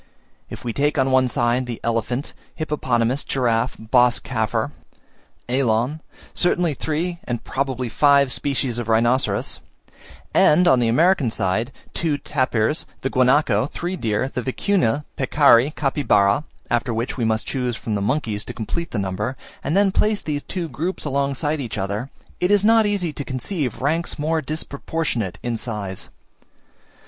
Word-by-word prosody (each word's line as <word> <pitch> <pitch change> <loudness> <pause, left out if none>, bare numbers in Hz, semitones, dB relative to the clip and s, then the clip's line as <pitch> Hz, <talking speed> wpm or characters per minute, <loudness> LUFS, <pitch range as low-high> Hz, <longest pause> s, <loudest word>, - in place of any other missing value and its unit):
If - - -8
we 120 -2 -3
take 145 +4 +1
on 130 - +3
the 135 - 0
one 130 0 +4
side, 120 +1 0
the 120 -2 -5
elephant, 115 +4 -1 0.2
hippopotamus, 130 -4 0
giraffe, 120 -2 0
bos 120 +2 +3
caffer, 110 +1 -1 0.8
elan, 125 +3 +1 0.3
certainly 175 -2 +1
three, 165 +5 -2
and 120 -2 -3
probably 130 -2 -2
five 140 +2 +4
species 130 -2 -1
of 115 -2 -4
rhinoceros; 120 +4 +1 0.7
and 175 +4 +5
on 130 -7 +5
the 120 - +2
American 155 +2 +3
side, 110 +3 -1 0.2
two 160 -4 0
tapirs, 130 -1 0
the 135 - -2
guanaco, 130 -3 +3
three 175 +5 -4
deer, 110 - -1
the 130 - -4
vicuna, 145 - 0
peccari, 140 -2 +5
capybara 130 -4 +2 0.3
(after 120 -1 0
which 115 +3 -2
we 125 - -2
must 110 -1 +1
choose 125 -3 -2
from 110 - -4
the 100 - -1
monkeys 110 -2 -1
to - - -7
complete 165 +9 -3
the - - -4
number), 100 +6 -2 0.3
and 150 +7 0
then 200 -1 +4
place 210 +2 +1
these 145 -2 -2
two 175 +1 -4
groups 170 +4 -4
alongside 140 +2 -1
each 115 -5 -5
other, 100 +6 -3 0.3
it 180 - +1
is 205 0 +4
not 225 -1 +5
easy 185 -6 -1
to 145 - -4
conceive 130 - -3
ranks 165 +4 0
more 160 +2 0
disproportionate 140 - -3
in 120 -1 -1
size. 105 -5 -4
130 Hz, 155 wpm, -22 LUFS, 115-150 Hz, 0.8 s, and